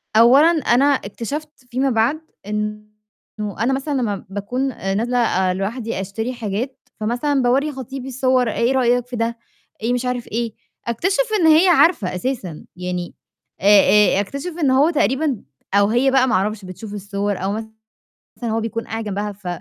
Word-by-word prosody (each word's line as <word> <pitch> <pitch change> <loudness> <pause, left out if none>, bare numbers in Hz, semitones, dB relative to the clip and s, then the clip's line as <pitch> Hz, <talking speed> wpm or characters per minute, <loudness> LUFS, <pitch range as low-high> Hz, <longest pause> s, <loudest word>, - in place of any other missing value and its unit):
أولًا، 250 +7 +7
أنا 280 -5 +2
اكتشفت 285 +3 -2 0.2
فيما 265 +3 +1
بعد 240 +6 +1 0.3
إنه 210 0 -1 0.9
أنا 245 +5 +2
مثلًا 275 +2 -2
لمّا 205 -5 -3
باكون 245 +7 -2
آآ 195 -5 -3
نازلة 245 +4 0
آآ 190 -6 +2
لوحدي 215 +3 -3
أشتري 220 +6 -4
حاجات، 235 +3 -5
فمثلًا 245 +6 0
باورّي 270 +5 +2
خطيبي 265 -1 -7
الصور 255 -2 +1
"إيه 235 +4 +1
رأيك 245 -2 +2
في 250 - -6
ده، 230 0 -1 0.4
إيه 235 +3 0
مش 245 0 -1
عارف 250 -1 -2
إيه" 230 0 -3 0.3
أكتشف 385 - +1 0.2
إن 330 - +4
هي 320 +4 +6
عارفة 325 - +4
أساسًا. 185 - -4
يعني 180 -1 -4 0.5
آآ 205 +1 +6
آآ - - +3
أكتشف 280 - -4
إن 270 - +4
هو 275 +5 +4
تقريبًا، 275 - 0 0.3
أو 200 0 +5
هي 245 +5 +2
بقى 260 -1 +4
ما 240 - +2
أعرفش، 205 +1 -1
بتشوف 185 +3 -8
الصور 200 0 -3
أو 195 - 0
مثلًا 220 0 -9 0.6
هو 220 +1 0
بيكون 230 +1 -3
قاعد 225 0 -4
جنبها 205 0 -3
ف 195 -2 -11
235 Hz, 165 wpm, -20 LUFS, 205-265 Hz, 0.9 s, أولًا